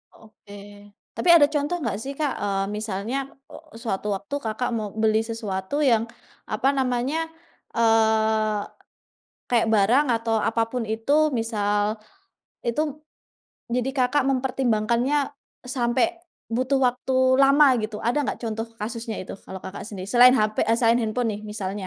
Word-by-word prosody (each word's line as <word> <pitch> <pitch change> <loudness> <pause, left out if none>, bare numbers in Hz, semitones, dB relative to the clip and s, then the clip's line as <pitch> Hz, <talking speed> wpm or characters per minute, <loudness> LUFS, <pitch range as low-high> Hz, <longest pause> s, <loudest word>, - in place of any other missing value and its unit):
Oke, 215 -2 -17 0.6
tapi 360 - 0
ada 290 -4 +7
contoh 295 +3 0
nggak 215 -5 -1
sih 275 - -5
Kak, 295 -3 0
eee, 195 -1 -1
misalnya 210 +3 -3 0.3
o - - -10 0.2
sewaktu 220 -3 -4
waktu 285 +9 -6
Kakak 225 +3 -2
mau 215 -2 -3
beli 220 0 +2
sesuatu 215 -1 -4
yang 230 -5 +4 0.4
apa 215 +4 -1
namanya? 265 +5 0 0.5
Eee, 220 -2 +2 0.9
kayak 235 -2 +2
barang 225 +8 +4
atau 225 0 -1
apa 230 0 +1
pun 250 -2 -2
itu 225 +4 -2 0.3
misal, 210 -2 0 0.8
itu, 235 +6 +1 0.9
jadi 250 +2 0
Kakak 265 +3 +2
mempertimbangkannya 250 0 +1 0.5
sampe, 240 -2 0 0.4
butuh 255 +4 0
waktu 250 +1 -2 0.3
lama 280 +2 +6 0.2
gitu? 215 0 -4
Ada 245 +5 +1
enggak - - -3
contoh 225 0 -3
kasusnya 225 0 -4
itu - - -8
kalau 190 - -7
Kakak 190 - -7
sendiri 195 -4 -7
selain 250 +1 +7
HP 215 -4 +1
eee, 225 - +3
selain 235 0 +4
handphone 230 +2 -1
nih - - -11
misalnya? 200 -2 -4
230 Hz, 140 wpm, -24 LUFS, 215-250 Hz, 0.9 s, ada